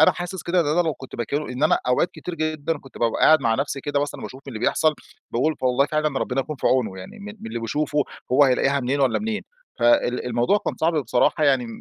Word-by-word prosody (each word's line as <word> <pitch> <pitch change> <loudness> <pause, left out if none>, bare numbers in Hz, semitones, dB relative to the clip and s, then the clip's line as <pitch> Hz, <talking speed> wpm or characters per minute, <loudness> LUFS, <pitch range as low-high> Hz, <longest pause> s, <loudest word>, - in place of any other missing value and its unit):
أنا 155 - +7
حاسس 180 +1 -6
كده 175 +1 +1
إن 155 - 0
أنا 165 +4 +3
لو 160 -4 -1
كنت 130 - -11
مكانه 140 +6 -2
إن 125 +3 -5
أنا 155 - +4
أوقات 150 +8 +2
كتير 180 - -7
جدًا، 155 0 -2
كنت 135 - -14
بابقى 115 -1 0
قاعد 155 -2 +7
مع 115 -3 +2
نفسي 140 +1 -2
كده 145 0 -1
مثلًا 145 - -4
باشوف 130 +2 -9
اللي 115 -4 -6
بيحصل، 155 +6 +2 0.4
باقول 150 +6 +1
والله 130 +2 +3
فعلًا 155 -2 0
ربنا 130 +1 -1
يكون 150 +2 -5
في - - -2
عونه، 110 -8 +1
يعني 95 - -10
مِن 205 +1 -8
مِن - - -8
اللي 115 +1 -4
بيشوفه، 150 +6 -1 0.3
هوّ 145 +2 +6
هيلاقيها 135 +2 +2
منين 135 +3 -1
والّا 130 -4 +2
منين؟! 215 -1 -3 0.4
فال 290 - +2
الموضوع 120 - +2
كان - - 0
صعب 165 +2 +3
بصراحة، 150 +5 +2
يعني 130 -4 +3
145 Hz, 235 wpm, -23 LUFS, 125-155 Hz, 0.4 s, أنا